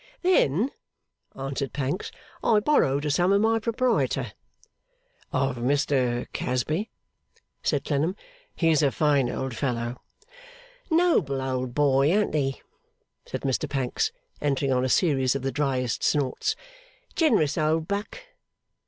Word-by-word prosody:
'Then,' 250 - +3 0.6
answered 135 0 -4
Pancks, 145 +6 -2 0.3
'I 215 -2 +4
borrowed 150 - +2
a 150 - +1
sum 180 +5 +2
of 200 - +4
my 225 +1 +3
proprietor.' 235 +2 0 1.0
'Of 135 -1 0
Mr 130 -1 +1
Casby?' 155 - -1 0.7
said 145 -2 0
Clennam. 155 +5 0 0.4
'He's 165 -3 +3
a 140 -2 +3
fine 140 -4 +2
old 130 -2 -3
fellow.' 120 -1 -2 0.9
'Noble 320 - +2
old 130 -2 -3
boy; 140 0 +3
an't 210 +2 +1
he?' 135 -3 -1 0.6
said - - -4
Mr 135 +2 -1
Pancks, 135 - -1 0.3
entering 140 -1 0
on 125 -1 +2
a 130 - 0
series 135 -5 +2
of 140 - -3
the 135 - -1
dryest 130 -3 -1
snorts. 150 - +1 0.6
'Generous 275 - +2
old 155 0 +1
buck. 205 - -3
145 Hz, 125 wpm, -26 LUFS, 130-180 Hz, 1.0 s, I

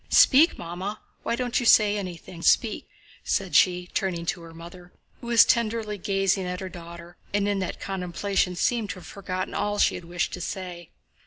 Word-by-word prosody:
Speak, 300 +5 +6
Mamma, 185 +5 -5 0.2
why 235 - -1
don't 245 0 0
you 245 - -3
say 210 -2 +6
anything? 180 -3 -7
Speak!" 220 +4 +2 0.4
said - - -1
she, 180 -1 +4
turning 175 -3 -1
to 170 - -2
her 165 0 -11
mother, 175 +2 -12 0.3
who 240 - -10
was 235 -1 +7
tenderly 220 -2 0
gazing 195 0 0
at 180 0 -4
her 190 - -5
daughter 170 0 -11 0.2
and 205 0 +1
in 200 -1 0
that 185 - -4
contemplation 190 0 -1
seemed 225 +3 0
to - - -4
have 185 - -12
forgotten 185 -2 -5
all 205 0 -1
she - - +3
had 180 - -7
wished 175 +1 -2
to 180 - -5
say. 175 -2 -6
185 Hz, 185 wpm, -25 LUFS, 175-205 Hz, 0.4 s, was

